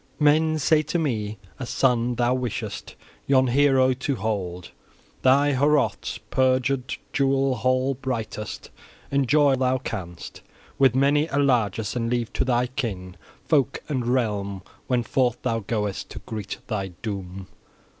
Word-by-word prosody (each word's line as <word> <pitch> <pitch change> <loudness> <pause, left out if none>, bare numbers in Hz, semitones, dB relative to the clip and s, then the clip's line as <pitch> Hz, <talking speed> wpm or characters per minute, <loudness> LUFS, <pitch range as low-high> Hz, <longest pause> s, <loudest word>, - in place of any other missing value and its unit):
Men 155 +1 +4
say 155 +1 +3
to 155 +3 -2
me, 110 -9 -2 0.2
as 125 - -5
son 125 -2 +2
thou 120 +1 +2
wishest 125 -3 -4 0.3
yon 130 -1 +4
hero 130 0 +4
to 130 +2 -2
hold. 95 -5 -3 0.5
Thy 140 +2 +4
Heorot 140 -5 +1
purged, 130 0 +1 0.2
jewel 135 -1 +2
hall 130 +1 +1
brightest, 115 -6 -5 0.4
enjoy 140 +2 +3
while - - +1
thou 130 0 +2
canst, 85 -9 -7 0.4
with 135 -3 +5
many 145 +3 +3
a 140 - -2
largess; 110 -7 +1
and 115 -1 -1
leave 120 -1 -1
to - - +1
thy 125 -1 +1
kin 105 -9 -4 0.3
folk 140 -4 +1
and 130 -5 -2
realm 105 -6 -1 0.2
when 125 -2 +1
forth 125 0 +1
thou 115 -3 0
goest 105 -2 -3
to - - -8
greet 110 -3 -5
thy 105 -5 -2 0.2
doom. 95 -3 -5
125 Hz, 140 wpm, -24 LUFS, 110-135 Hz, 0.5 s, with